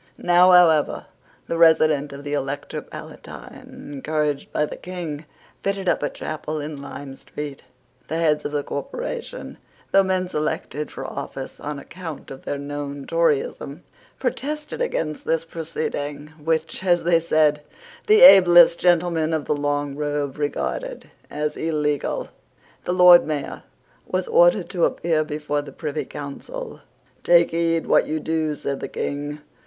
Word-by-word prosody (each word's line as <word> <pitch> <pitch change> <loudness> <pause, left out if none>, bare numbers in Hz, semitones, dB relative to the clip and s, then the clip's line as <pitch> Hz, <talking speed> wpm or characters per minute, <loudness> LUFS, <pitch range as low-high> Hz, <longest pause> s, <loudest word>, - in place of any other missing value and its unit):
Now, 175 +1 +5
however, 170 -4 +5 0.4
the 165 - -3
resident 155 -3 +4
of 140 0 -9
the 145 0 -4
Elector 145 0 -3
Palatine, - - -11
encouraged 150 0 -2
by 150 - +1
the - - -7
King, 165 -4 -6 0.4
fitted 195 -1 -2
up 175 - +2
a 145 - 0
chapel 155 0 -5
in 145 -1 -6
Lime 140 -1 -8
Street. 145 0 -8 0.5
The 160 - -2
heads 155 -2 +2
of - - -4
the 145 -1 -1
corporation, 485 - -6 0.3
though 195 - +6
men 185 -1 0
selected 150 -2 -3
for - - -7
office 135 -1 -7
on 150 0 -5
account 165 +1 -9
of 135 - -10
their 145 - -2
known 140 0 -6
Toryism, 160 -1 -1 0.3
protested 300 - -3
against 160 - -2
this 165 0 0
proceeding, 150 -3 -4
which, 160 +3 -1
as 175 -2 +2
they 170 0 +4
said, 155 -2 +2 0.5
the 430 +2 +6
ablest 175 - +9
gentlemen 170 -2 +2
of 155 - -3
the - - +1
long 145 -1 -1
robe 145 -1 -3
regarded - - -3 0.2
as 150 0 -3
illegal. 150 -3 -1 0.6
The 180 - 0
Lord 180 -2 +7
Mayor 150 -3 -4 0.5
was - - -2
ordered - - +4
to - - +1
appear 165 - 0
before 150 -1 -2
the 145 - -10
Privy 155 -1 -4
Council. 450 - -8 0.4
"Take 170 -1 +5
heed 165 0 0
what - - +3
you 155 +1 -2
do," 160 -1 -1
said 140 -1 -4
the - - -4
King. 145 +1 -4
155 Hz, 145 wpm, -23 LUFS, 145-175 Hz, 0.6 s, ablest